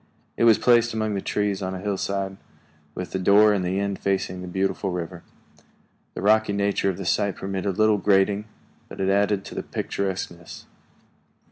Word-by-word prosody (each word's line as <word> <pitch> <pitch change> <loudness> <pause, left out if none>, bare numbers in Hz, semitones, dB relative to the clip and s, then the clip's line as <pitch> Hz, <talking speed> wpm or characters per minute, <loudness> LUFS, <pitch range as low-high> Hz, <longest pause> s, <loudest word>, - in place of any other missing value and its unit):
It - - +2
was 115 -2 +7
placed 120 -2 +3
among 110 -1 -1
the 100 - -2
trees 105 -1 -1
on 95 0 -3
a - - -5
hillside, 100 -1 -2 0.6
with 90 -1 -5
the 95 - -2
door 105 +3 +5
in 100 - 0
the 90 +2 -1
end 100 -1 -2
facing 95 -2 -1
the 90 - -7
beautiful 95 +2 -1
river. 90 -1 -5 0.9
The - - -5
rocky 110 0 +3
nature 100 -1 +1
of 90 - -3
the 95 - -6
site 100 +1 +1
permitted 95 0 -3
little 110 -1 +3
grading, 100 +1 +2 0.4
but - - -10
it 95 0 +1
added 100 0 +1
to - - -9
the - - -3
picturesqueness. 90 -3 -5
100 Hz, 175 wpm, -24 LUFS, 95-105 Hz, 0.9 s, was